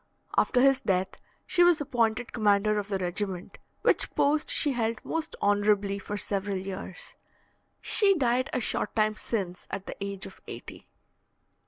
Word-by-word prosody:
After 250 - +3
his 270 0 +5
death, 190 0 0 0.3
she 350 -1 +4
was 350 -2 +5
appointed 240 -4 0
commander 210 -1 +3
of 200 - -4
the 200 -2 -1
regiment, 185 +1 -3 0.2
which - - +3
post 300 +2 +2
she 295 - +3
held 230 -3 -1
most 325 -1 -3
honourably 205 -1 +2
for 205 +1 -5
several 200 0 -2
years. 190 -1 -7 0.7
She 395 -2 +3
died 255 -1 +1
a - - 0
short 210 - -1
time 215 -1 +3
since 195 -5 -4
at 195 0 -5
the - - -6
age 200 -1 -4
of - - -12
eighty. - - -9
210 Hz, 155 wpm, -28 LUFS, 195-250 Hz, 0.7 s, his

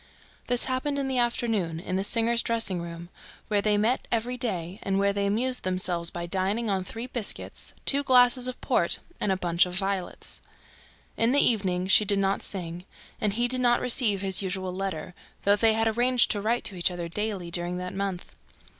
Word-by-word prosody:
This 245 0 +4
happened 265 +2 -2
in 275 -1 -1
the 260 -2 0
afternoon, 225 -8 0
in 185 +2 -4
the 190 - 0
singer's 230 +2 +2
dressing 225 -6 -1
room, 170 0 -8 0.4
where 205 -1 +2
they 210 0 +2
met 225 +5 0
every 235 +2 -1
day 195 -7 -3
and 195 0 -1
where 200 0 +2
they 200 0 0
amused 250 +5 0
themselves 180 -2 0
by 175 0 -5
dining 195 +5 -1
on 190 -1 -1
three 225 +5 -6
biscuits, 240 -4 -3
two 280 0 +4
glasses 250 -1 +4
of 255 - -5
port - - +1 0.2
and 200 - 0
a 190 - +1
bunch 175 0 +2
of 180 - -5
violets. 195 -1 -3 0.8
In 230 +3 +2
the 285 - +5
evening, 190 -8 +3
she 190 +3 +6
did 200 -1 +1
not 195 0 0
sing; 175 -2 -6 0.4
and 210 -2 +1
he 240 +3 +1
did 255 +1 0
not 240 -1 +3
receive 230 -6 +3
his 190 -1 +1
usual 185 -1 -3
letter, 185 -2 -4 0.3
though 200 +1 +4
they 220 +1 +3
had 225 +1 +1
arranged 245 +2 +3
to 205 - -1
write 230 +3 0
to 195 - -2
each 175 0 +2
other 175 -1 -5
daily 195 -1 -3
during 175 +1 -1
that 180 0 -5
month. 195 -2 -4
200 Hz, 200 wpm, -26 LUFS, 185-235 Hz, 0.8 s, she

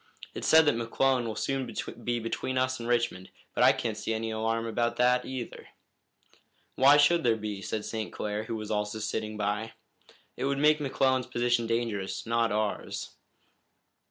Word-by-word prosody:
It's - - -4
said 160 0 +7
that 145 - +3
McClellan 120 +2 +1
will 110 - -4
soon 135 +1 -2 0.3
be 120 0 0
between 115 +3 -3
us 130 0 0
and 115 0 -5
Richmond, 120 -6 0 0.2
but - - +2
I - - +8
can't 115 -3 -2
see 110 +1 -2
any 110 0 -3
alarm 115 +1 -1
about 120 +1 0
that 125 +1 +3
either." 130 -3 -6 1.1
"Why 140 +3 +6
should 160 +3 +4
there 115 -2 +3
be?" 105 -2 -5
said 105 +3 -3
St. 110 -1 -4
Clair, 105 +1 -3
who 115 - -4
was 110 -1 -5
also 105 0 -1
sitting 110 0 -3
by. 105 +2 -2 0.6
"It - - -3
would 140 0 0
make 150 +2 +4
McClellan's 130 -2 +1
position 120 -2 +1
dangerous, 115 -4 -2
not 115 -1 +1
ours." 105 0 -2
115 Hz, 170 wpm, -29 LUFS, 110-130 Hz, 1.1 s, I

